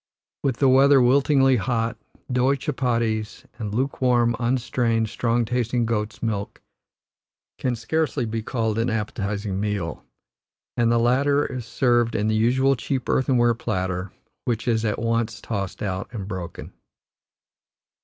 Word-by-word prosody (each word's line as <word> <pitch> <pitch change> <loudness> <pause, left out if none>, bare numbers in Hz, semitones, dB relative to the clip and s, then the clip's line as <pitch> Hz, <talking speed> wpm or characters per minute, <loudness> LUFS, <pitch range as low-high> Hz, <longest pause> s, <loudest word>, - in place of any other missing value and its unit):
With 130 -4 0
the 135 - +3
weather 135 +2 +6
wilting 135 +3 +4 0.2
hot, 115 0 -1 0.4
doughy 125 +3 +2
chuppaties 115 -6 -1
and 105 -3 -4
lukewarm, 120 -1 +1
unstrained, 120 -2 0
strong 115 +1 0
tasting 120 0 0
goats' 110 -1 -3
milk 105 -3 -3 1.0
can 125 -2 0
scarcely 150 +1 -1
be 115 0 -3
called 110 -1 -1
an 115 +2 +1
appetizing 105 -2 -2
meal, 100 -6 -3 0.7
and 115 -1 +2
the 120 - +3
latter 140 +5 +3
is 125 -3 -5
served 120 -3 +2
in 105 0 0
the 110 - +1
usual 130 +5 +3
cheap, 125 +2 -3
earthenware 120 -3 +3
platter, 95 -5 -3 0.3
which 120 0 -2
is 115 -2 +1
at 105 - 0
once 115 -1 -1
tossed 100 -4 -4
out 95 -1 -3
and 105 -5 -6
broken. 95 -4 -7
115 Hz, 135 wpm, -24 LUFS, 110-125 Hz, 1.0 s, weather